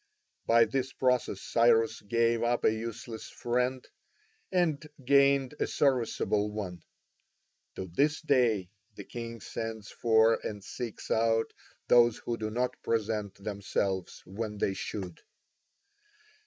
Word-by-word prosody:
By 115 0 +6
this 130 +3 -2
process 125 -7 +1
Cyrus 115 -1 +3
gave 115 +2 +1
up 120 +1 +1
a 110 - +5
useless 115 0 -6
friend 125 +2 -1 0.6
and 170 -6 +1 0.2
gained 140 0 +4
a - - +1
serviceable 115 -6 +1
one. 95 -5 -5 0.9
To 95 - -4
this 140 - +1
day 120 - +2 0.2
the 100 - -8
king 115 +1 -7
sends 110 -1 -6
for 115 -1 +4
and 105 -2 -5
seeks 115 +1 -6
out 115 0 +2 0.3
those 120 -2 +5
who 120 - -3
do 110 -1 -3
not 125 +3 -2
present 105 -3 -1
themselves 100 -2 -2
when 105 +2 -5
they 100 - 0
should. 95 -3 -6
115 Hz, 120 wpm, -30 LUFS, 105-125 Hz, 0.9 s, By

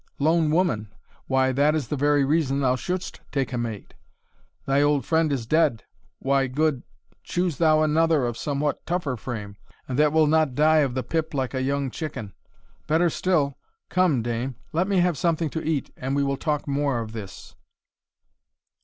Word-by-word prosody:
"Lone 160 +2 +2
woman! 150 - 0 0.4
why, 130 0 +2
that 145 +4 +2
is 145 -7 -2
the - - -1
very 145 0 +2
reason 140 -2 +1
thou 130 -2 +2
shouldst 180 +8 -4
take 135 -2 -1
a - - -1
mate. 115 -4 -5 0.7
Thy 135 +1 +2
old 145 -3 +2
friend 160 -2 +2
is 130 -5 -2
dead, 140 -4 +2 0.3
why, 135 0 +1
good 140 0 0 0.4
choose 175 -4 -1
thou 155 -2 +4
another 155 -2 +2
of 120 -1 -2
somewhat 145 +2 -2
tougher 170 -6 -1
frame, 105 -4 -6 0.3
and 130 +1 -2
that 150 0 +4
will 160 0 +4
not 155 -3 +2
die 155 +2 +4
of 135 -4 +1
the 130 - -1
pip 160 -2 -2
like 130 -1 -1
a 130 - -1
young 140 0 -1
chicken. 115 - -6 0.5
Better 165 +3 +3
still 150 -8 0 0.3
Come, 170 -10 +2
dame, 120 +2 -3 0.2
let 175 +4 +1
me 195 -3 +2
have 175 -5 +1
something 165 -3 0
to 160 - -4
eat, 155 -4 -1
and 135 +2 -3
we 140 - +2
will 140 0 0
talk 150 +1 -2
more 140 -3 0
of 110 -1 -5
this." 105 -4 -9
145 Hz, 180 wpm, -24 LUFS, 130-160 Hz, 0.7 s, thou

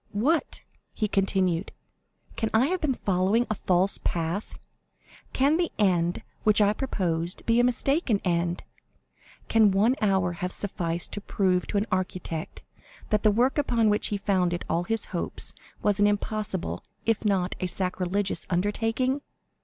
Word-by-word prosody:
What!" 280 +11 0 0.3
he 215 - 0
continued, 190 -3 0 0.6
"can 225 - -1
I 230 +4 +5
have 370 0 -1
been 275 -4 +1
following 195 +5 +1
a - - 0
false 185 -1 +2
path?—can 200 - -3
the 345 -1 0
end 175 -4 +1 0.2
which 215 0 +4
I 205 0 +4
proposed 175 -9 -2
be 230 +1 +3
a - - +5
mistaken 250 - +2
end?—can 175 +5 -1
one 210 +6 +3
hour 190 -4 +2
have 180 +1 -4
sufficed 170 -4 -3
to 205 - -3
prove 185 -3 0
to - - -1
an 205 - +1
architect 185 -3 -3 0.5
that 210 -1 +2
the 215 - +4
work 245 +7 +2
upon 230 -6 +2
which 210 - +1
he 205 - -2
founded 180 -3 0
all 170 +2 0
his 225 +3 -1
hopes 175 - -1 0.3
was 205 -1 +2
an 205 - +5
impossible, 205 - -2 0.2
if 225 -2 +1
not 195 -3 +1
a 185 - -1
sacrilegious, 185 +2 -1
undertaking? 225 +8 0
200 Hz, 145 wpm, -26 LUFS, 180-225 Hz, 0.6 s, I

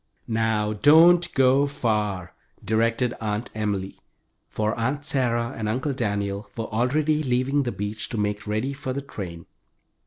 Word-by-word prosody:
"Now 110 -1 0
don't 165 +9 +6
go 135 +2 +4
far," 105 -9 -1 0.3
directed 115 +2 +1
Aunt 110 +2 -3
Emily, 100 -3 -3 0.5
for 110 0 -1
Aunt 130 +5 -2
Sarah 120 -4 0
and 110 -1 -3
Uncle 130 +5 -1
Daniel 100 -4 -2
were 115 - -2
already 150 +6 +1
leaving 130 +1 +1
the 125 -3 -2
beach 105 +2 -4
to 115 - -4
make 105 0 -2
ready 110 +6 -1
for 135 -2 -4
the 140 +1 -4
train. 85 - -7
115 Hz, 145 wpm, -24 LUFS, 105-135 Hz, 0.5 s, don't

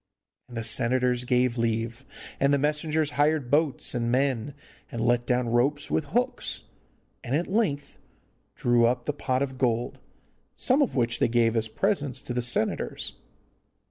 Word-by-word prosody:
And 120 -2 -9
the 115 - -2
senators 125 +2 +1
gave 125 -1 +1
leave, 115 +2 -1 0.3
and 140 +1 +3
the 140 - +4
messengers 150 +1 0
hired 145 -4 +1
boats 150 -1 +1
and 120 -1 -1
men, 135 0 0 0.4
and 120 - -5
let 120 +1 +1
down 125 -1 +1
ropes 135 +5 +1
with 155 - +1
hooks, 245 - -1 0.6
and 130 +2 -1
at 170 +4 +1
length 190 -9 -1 0.6
drew 120 -1 +3
up 125 0 -1
the 150 - -1
pot 130 -2 -1
of 130 -2 -5
gold, 120 -2 0 0.6
some 265 +3 +2
of 280 - +1
which 120 -2 +1
they - - +3
gave 115 -1 +2
as 115 -1 0
presents 145 - -1
to 120 - -4
the 125 - 0
senators. 120 -2 -1
125 Hz, 160 wpm, -26 LUFS, 120-145 Hz, 0.6 s, the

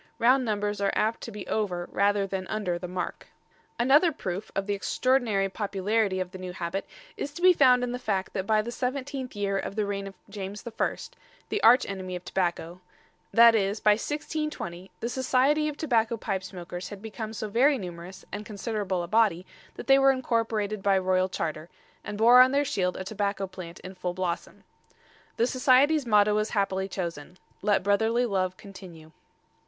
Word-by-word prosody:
Round 255 +3 +4
numbers 205 -2 -2
are 200 - +2
apt 220 +2 0
to 230 - -7
be 210 -2 -7
over 180 -5 -2
rather 200 0 +2
than 190 -1 -4
under 195 -5 -2
the 180 - -5
mark. 180 0 -5 0.5
Another 285 +8 +4
proof 190 - -5
of 195 - -1
the 205 - -1
extraordinary 220 -1 +1
popularity 200 0 -1
of 185 -1 -3
the 185 - -9
new 185 -1 -6
habit 175 +2 -4 0.3
is 285 - -4
to 345 - -8
be 365 0 +8
found 255 -5 +5
in 245 - -2
the 250 - -4
fact 200 -6 -2
that 190 -1 -3
by 215 -1 +3
the 235 - -5
seventeenth 260 0 -4
year 200 -1 -1
of 195 - -5
the 215 -1 0
reign 200 -1 -3
of 195 - -10
James 200 0 -7
I 235 -2 -1 0.5
the 420 - -1
arch 245 +3 +6
enemy 185 -2 -5
of 180 0 -8
tobacco 175 -1 -2 0.5
that 235 0 +7
is, 205 -1 +1
by 210 - +4
1620, 260 - -3
the 235 - -1
Society 260 +4 +2
of 295 -1 -4
Tobacco 235 -7 +1
pipe 195 -4 -4
makers 180 0 -7
had 205 - -8
become 220 0 -6
so 215 -1 -4
very 260 +7 +3
numerous 180 -1 -8
and 205 +2 -5
considerable 205 -4 -3
a - - -5
body 200 -3 +2 0.3
that - - -8
they 270 0 +6
were 270 0 +5
incorporated 225 -5 0
by 195 0 +3
royal 185 0 +1
charter, 155 -2 -4 0.3
and 205 - -6
bore 240 +3 +8
on 255 0 +6
their 285 +1 +2
shield 180 -7 -1
a - - -4
tobacco 200 0 -2
plant 180 -2 -9
in 185 - -9
full 180 -1 -4
blossom. 180 -2 -4 0.7
The 235 - +3
Society's 260 +3 +3
motto 210 -1 +4
was 215 +1 0
happily 195 -2 0
chosen 175 -3 -6 0.2
"Let 205 -1 +2
brotherly 220 +5 +2
love 185 -4 -1
continue." 180 -6 -12
205 Hz, 185 wpm, -27 LUFS, 185-235 Hz, 0.7 s, be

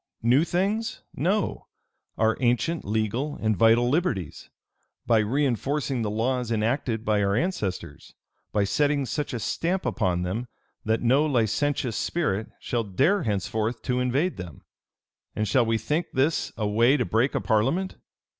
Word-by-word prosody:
New 125 +6 +4
things? 200 +6 -1
No: 195 +7 -1 0.5
our 110 0 +2
ancient, 125 +7 +1
legal, 110 +8 -1
and 110 -1 +1
vital 115 +3 +4
liberties; 125 - -1 0.6
by 115 -2 +4
reënforcing 135 +2 0
the 110 - -1
laws 120 +2 -1
enacted 115 0 -1
by 105 -1 +2
our 100 0 +1
ancestors; 110 - -3 0.4
by 105 - +2
setting 140 +6 +1
such 145 +4 -3
a 125 - -3
stamp 175 - -1
upon 90 -4 0
them, 110 +8 -3 0.4
that 110 +2 0
no 130 +5 +4
licentious 120 0 0
spirit 110 - -1
shall 120 -1 -1
dare 135 - +2
henceforth 110 - -2
to 125 -1 0
invade 135 +8 0
them. 90 -3 -9 0.7
And 110 - -1
shall 115 +3 +3
we 115 0 +2
think 150 +10 -1
this 145 +5 +1
a 105 - -1
way 115 +7 +4
to 125 - 0
break 115 +6 +1
a - - +2
parliament? 135 - 0
120 Hz, 145 wpm, -26 LUFS, 110-145 Hz, 0.7 s, New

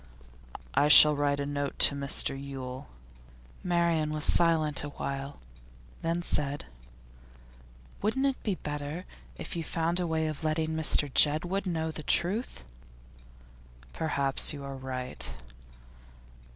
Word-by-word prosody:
'I 145 +1 +2
shall 150 0 +10
write 145 0 -1
a 140 - -2
note 145 -1 -4
to - - +7
Mr 140 -1 +1
Yule.' 135 -2 -8 0.8
Marian 170 -3 0
was 155 0 -1
silent 155 -4 +2
a 145 - -5
while, 140 0 -6 0.6
then 170 +1 -2
said: 145 -3 -2 1.4
'Wouldn't 245 +7 -1
it 275 -1 -1
be 205 -4 -2
better 150 +3 -6 0.3
if - - -7
you 165 - -3
found 165 +2 -2
a 180 - -2
way 160 -1 -1
of 155 0 -5
letting 155 0 -1
Mr 160 -2 +1
Jedwood 175 +6 +2
know 160 -2 -2
the 155 - -8
truth?' 180 - 0 1.3
'Perhaps 140 -4 0
you 140 -1 -8
are 140 0 -7
right. 125 - -5
150 Hz, 125 wpm, -28 LUFS, 140-170 Hz, 1.4 s, shall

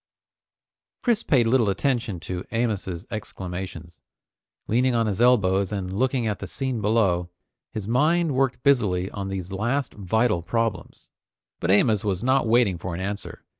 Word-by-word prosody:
Chris 235 -3 +2
paid 130 - +3
little 115 -2 +3
attention 115 -3 -1
to 90 +2 -5
Amos's 105 -6 -2
exclamations. 90 -5 -6 0.7
Leaning 125 +2 +2
on 115 -1 +2
his 105 0 -1
elbows 100 -6 +3
and 95 -2 -3
looking 130 +2 +1
at 105 -3 -2
the 100 - -6
scene 130 +1 -3
below, 100 -5 +2 0.4
his 105 -2 -5
mind 155 +6 +2
worked 130 -2 0
busily 100 -10 +2
on 100 -1 -5
these 95 -1 -5
last 120 +7 -1
vital 105 0 +1
problems. 110 -1 -3 0.5
But 85 - -2
Amos 105 +1 +4
was 100 -1 -1
not 130 -1 +2
waiting 110 -6 +3
for 90 0 -4
an - - -5
answer. 100 +2 -5
105 Hz, 150 wpm, -24 LUFS, 95-125 Hz, 0.7 s, Amos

